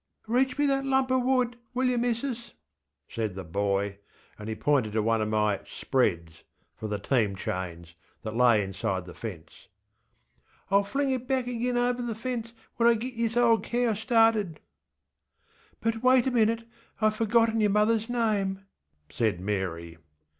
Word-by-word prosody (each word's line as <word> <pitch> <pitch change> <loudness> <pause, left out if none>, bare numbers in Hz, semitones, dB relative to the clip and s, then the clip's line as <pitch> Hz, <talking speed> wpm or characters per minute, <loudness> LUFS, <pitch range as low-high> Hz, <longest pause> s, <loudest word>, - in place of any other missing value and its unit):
ŌĆśReach 255 +3 +1
me 290 - +2
that 275 -1 +1
lump 265 -1 +1
er 260 - +3
wood, 250 -1 +1 0.2
will 255 +1 +2
yer, 250 -1 +1
missus? 235 0 -2 0.6
ŌĆÖ - - -19
said 110 -5 -2
the 95 - -5
boy, 100 +3 -1 0.4
and 105 +1 -6
he 110 - -3
pointed 130 -5 +1
to 110 -1 +1
one 115 0 +2
of 105 - -1
my 105 -2 +1
ŌĆśspreadsŌĆÖ 85 - -1 0.3
(for 110 - -6
the 105 -1 -2
team 105 -2 0
chains) 85 -3 -5 0.3
that 110 0 -5
lay 120 -4 +4
inside 95 -1 -3
the 90 - -10
fence. 85 -7 -9 1.0
ŌĆśIŌĆÖll 200 0 +3
fling 275 +4 0
it 255 -1 -3
back 260 -2 0
agin 245 0 -1
over 245 0 +1
the 235 -2 -3
fence 230 0 -4 0.3
when 235 0 +5
I 235 - +5
git 245 +3 -5
this 230 0 -1
ole 230 -2 +5
cow 240 -1 0
started. 220 -6 +2 1.2
ŌĆÖ 225 - +3
ŌĆśBut 225 0 -8
wait 255 -1 +5
a 265 - +1
minuteŌĆöIŌĆÖve 230 -1 0
forgotten 225 +1 +2
your 210 - +3
motherŌĆÖs 215 +2 +2
name, 205 -5 0 0.4
ŌĆÖ - - -20
said 110 -7 0
Mary. 90 -4 -3
215 Hz, 170 wpm, -27 LUFS, -, 1.2 s, when